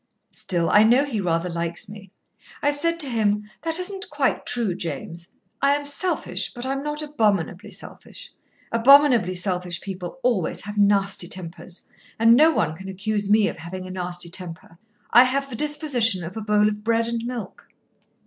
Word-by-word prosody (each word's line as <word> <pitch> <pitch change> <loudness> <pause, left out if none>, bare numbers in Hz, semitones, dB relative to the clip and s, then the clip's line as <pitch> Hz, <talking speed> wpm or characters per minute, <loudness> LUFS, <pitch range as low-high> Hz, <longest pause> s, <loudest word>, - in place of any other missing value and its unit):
Still, 170 -3 0
I 210 - +6
know 240 +6 +5
he 230 -8 -3
rather 170 -1 0
likes 170 +3 -2
me. 200 -1 -11 0.5
I 290 - +4
said 335 +4 0
to 290 - +2
him: 210 -3 0
'That 325 0 -1
isn't 385 +2 -3
quite - - -1
true, 230 -6 0
James. 170 +1 -6 0.3
I 280 +1 +4
am 290 0 -4
selfish, 285 - -1
but 240 +1 -6
I'm 270 +1 -2
not 295 +1 -4
abominably 210 - 0
selfish. 185 - -10 0.4
Abominably 240 -5 +5
selfish 180 -2 -1
people 185 +3 -7
always 235 -9 0
have 205 +2 -7
nasty 200 -3 +2
tempers, 175 0 -7 0.3
and 230 +1 +6
no 305 +7 +6
one 160 - 0
can 190 +3 -9
accuse 205 +1 -2
me 210 0 +4
of - - -4
having 180 +3 -7
a 185 - -8
nasty 175 -1 -3
temper. 170 -2 -8 0.3
I 245 +2 +8
have 275 +2 -1
the - - -4
disposition 255 - 0
of 170 +3 -7
a 220 - -4
bowl 210 0 +3
of 210 0 -3
bread 230 0 +1
and 235 -1 -3
milk." 235 -5 -6
210 Hz, 175 wpm, -23 LUFS, 180-255 Hz, 0.5 s, I